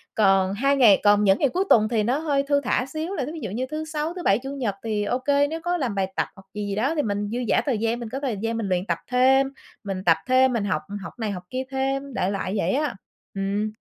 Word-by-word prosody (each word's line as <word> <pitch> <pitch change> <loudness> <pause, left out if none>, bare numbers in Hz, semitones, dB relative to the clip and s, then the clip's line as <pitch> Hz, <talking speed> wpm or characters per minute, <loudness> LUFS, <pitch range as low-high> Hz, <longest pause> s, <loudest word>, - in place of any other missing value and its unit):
còn 195 -2 +3
2 275 +6 +2
ngày 235 -8 +6
còn 205 0 +5
những 195 -1 +4
ngày 280 - +3
cuối 370 +7 0
tuần 215 -2 +5
thì 225 -3 +1
nó 245 +5 +1
hơi 285 -3 +1
thư 285 0 +2
thả 250 -1 0
xíu 315 +7 -4
là 290 -9 -2
thí 300 - -6
ví 325 - -7
dụ 220 - -4
như 245 +5 -2
thứ 310 +1 -3
Sáu, 310 +1 -3
thứ 360 -1 -7
Bảy, 195 -5 +3
Chủ 270 +2 -7
nhật 230 -8 -2
thì 215 -2 -1
ô 245 +5 -1
kê 285 +2 +2
nếu 325 +2 -5
có 350 +1 0
làm 255 -9 -2
bài 190 -1 -1
tập - - 0
hoặc 195 -1 -16
gì 210 -1 -4
gì 200 - -2
đó 260 +10 0
thì 300 - +2
mình 205 -3 -2
dư 235 +3 -3
dả - - +3
thời 255 -6 +1
gian, 230 +2 -1
mình 235 -2 -6
có 265 - -4
thời 255 -7 -2
gian 225 +2 -2
mình 215 -4 -2
luyện 180 0 0
tập 170 -4 -1
thêm, 265 +2 +4 0.4
mình 195 -2 -4
tập 165 -2 +5
thêm, 255 0 +4
mình 215 -3 -1
học 170 -6 0 0.2
học - - -8
này 220 -3 -2
học 180 -2 -6
kia 255 +1 -3
thêm, 270 +1 -2
đại 190 -3 0
loại 195 -1 -3
vậy 190 -1 +1
á, 290 -3 0 0.4
ừm. 200 +2 -1
235 Hz, 285 wpm, -24 LUFS, 205-275 Hz, 0.4 s, ngày